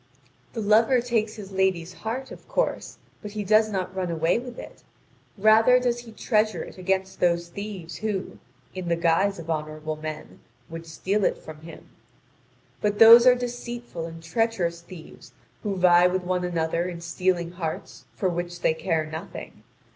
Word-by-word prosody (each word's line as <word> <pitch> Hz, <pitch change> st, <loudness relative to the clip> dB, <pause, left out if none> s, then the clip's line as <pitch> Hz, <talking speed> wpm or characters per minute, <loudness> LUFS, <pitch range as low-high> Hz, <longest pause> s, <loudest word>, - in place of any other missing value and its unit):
The 225 Hz, -, -3 dB
lover 220 Hz, +5 st, +4 dB
takes 230 Hz, -3 st, -1 dB
his 200 Hz, -3 st, -9 dB
lady's 190 Hz, -2 st, 0 dB
heart, 240 Hz, +7 st, -5 dB
of -, -, -12 dB
course, -, -, -2 dB, 0.2 s
but 205 Hz, -1 st, -8 dB
he 210 Hz, -1 st, -3 dB
does 215 Hz, +2 st, +4 dB
not 185 Hz, -2 st, -3 dB
run 185 Hz, -2 st, -2 dB
away 165 Hz, +5 st, +1 dB
with 245 Hz, -1 st, -9 dB
it; -, -, -10 dB, 0.6 s
rather 220 Hz, +4 st, +6 dB
does 245 Hz, -1 st, 0 dB
he 240 Hz, -1 st, -11 dB
treasure 215 Hz, -5 st, 0 dB
it -, -, -12 dB
against 190 Hz, +1 st, -1 dB
those 170 Hz, -1 st, +1 dB
thieves 195 Hz, -3 st, -7 dB
who, 210 Hz, -3 st, -4 dB, 0.3 s
in 185 Hz, -2 st, -5 dB
the 170 Hz, -, +2 dB
guise 170 Hz, +4 st, +2 dB
of 165 Hz, -1 st, -9 dB
honourable 155 Hz, 0 st, -4 dB
men, 155 Hz, 0 st, -7 dB, 0.3 s
would 165 Hz, 0 st, -8 dB
steal 195 Hz, +6 st, -1 dB
it -, -, +2 dB
from 155 Hz, -1 st, -11 dB
him. 160 Hz, 0 st, -12 dB, 0.9 s
But 205 Hz, 0 st, 0 dB
those 230 Hz, +2 st, +9 dB
are 250 Hz, -, +8 dB
deceitful 240 Hz, -7 st, -5 dB
and 165 Hz, 0 st, -10 dB
treacherous 175 Hz, -2 st, -1 dB
thieves 170 Hz, -1 st, -13 dB, 0.3 s
who 205 Hz, -3 st, -2 dB
vie 180 Hz, -1 st, +6 dB
with 185 Hz, 0 st, -1 dB
one 180 Hz, 0 st, -1 dB
another 170 Hz, 0 st, -1 dB
in 170 Hz, -2 st, -7 dB
stealing 170 Hz, 0 st, -1 dB
hearts 160 Hz, -6 st, -6 dB
for 185 Hz, -, 0 dB
which 175 Hz, 0 st, -4 dB
they -, -, +3 dB
care 160 Hz, -1 st, -1 dB
nothing. 155 Hz, +1 st, -8 dB
185 Hz, 170 wpm, -25 LUFS, 170-215 Hz, 0.9 s, those